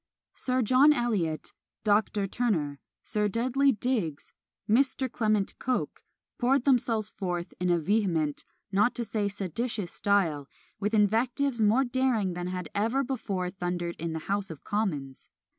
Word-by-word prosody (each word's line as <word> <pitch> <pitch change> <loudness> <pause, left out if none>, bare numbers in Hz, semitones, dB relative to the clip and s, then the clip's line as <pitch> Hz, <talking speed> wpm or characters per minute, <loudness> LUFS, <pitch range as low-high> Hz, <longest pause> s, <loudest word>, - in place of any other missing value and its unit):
Sir 255 -1 0
John 260 +7 +6
Eliot, 205 - -1 0.3
Dr. 210 -1 +2
Turner, 175 - -1 0.2
Sir 210 -2 0
Dudley 255 +6 +2
Digges, 210 - -2 0.3
Mr. 260 +2 +2
Clement 215 -4 +1
Coke, 255 0 -2 0.4
poured 260 +1 +3
themselves 230 -5 +2
forth 175 -4 -4
in 180 0 0
a 175 - +4
vehement, 165 -5 0 0.3
not 210 +5 +3
to 240 - -2
say 210 -1 -1
seditious 200 +1 -3
style, 175 -11 +1 0.3
with 210 +2 0
invectives 235 +4 +2
more 220 +5 +4
daring 245 -7 +1
than 175 0 -4
had 180 -2 -4
ever 230 +7 +1
before 200 -9 -3
thundered 175 -2 -3
in 165 0 -3
the - - -2
House 200 0 -1
of 160 -4 -9
Commons! 150 -11 -3
210 Hz, 140 wpm, -28 LUFS, 180-240 Hz, 0.4 s, John